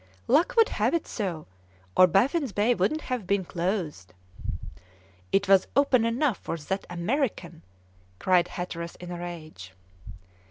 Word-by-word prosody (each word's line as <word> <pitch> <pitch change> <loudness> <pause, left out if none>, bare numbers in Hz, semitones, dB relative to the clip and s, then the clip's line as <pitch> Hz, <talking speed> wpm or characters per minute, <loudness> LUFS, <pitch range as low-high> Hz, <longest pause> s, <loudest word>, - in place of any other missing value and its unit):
"Luck 300 +8 +3
would 455 - +6
have - - +1
it 335 - -1
so, 180 -8 -4 0.5
or 185 - +8
Baffin's 255 - +2
Bay 210 +5 +2
wouldn't 310 +6 0
have 250 -9 -4
been 200 -2 +1
closed." 170 - -3 1.2
"It 200 0 +2
was 195 -1 +5
open 270 -4 +4
enough 235 +1 +1
for 165 - -4
that 190 +6 -4
American!" 175 - -2 0.6
cried 180 - +3
Hatteras 170 -2 -5
in 180 0 -9
a 175 - -5
rage. 155 - -8
190 Hz, 135 wpm, -27 LUFS, 170-245 Hz, 1.2 s, or